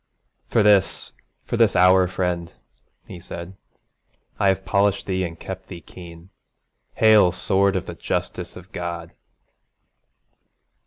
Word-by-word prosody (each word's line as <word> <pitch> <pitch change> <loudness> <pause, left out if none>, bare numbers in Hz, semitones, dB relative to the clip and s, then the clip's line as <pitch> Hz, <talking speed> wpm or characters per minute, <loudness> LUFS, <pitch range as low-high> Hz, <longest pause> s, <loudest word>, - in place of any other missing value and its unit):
'For 115 - +2
this, 100 -3 +2 0.3
for - - -3
this 115 -4 +3
hour, 90 +1 +5
friend,' 90 -2 -3 0.5
he 90 - -10
said, 85 +2 -9 0.8
'I 100 - +3
have 95 0 +1
polished 100 +1 +1
thee 95 -1 -1
and 85 -2 -6
kept 95 0 -8
thee 90 - -9
keen. 85 +1 -13 0.6
Hail, 110 -5 +5
sword 95 +2 +1
of 95 - -2
the - - -7
justice - - -4
of - - -13
God!' 85 -1 -5
95 Hz, 125 wpm, -22 LUFS, 85-100 Hz, 0.8 s, hour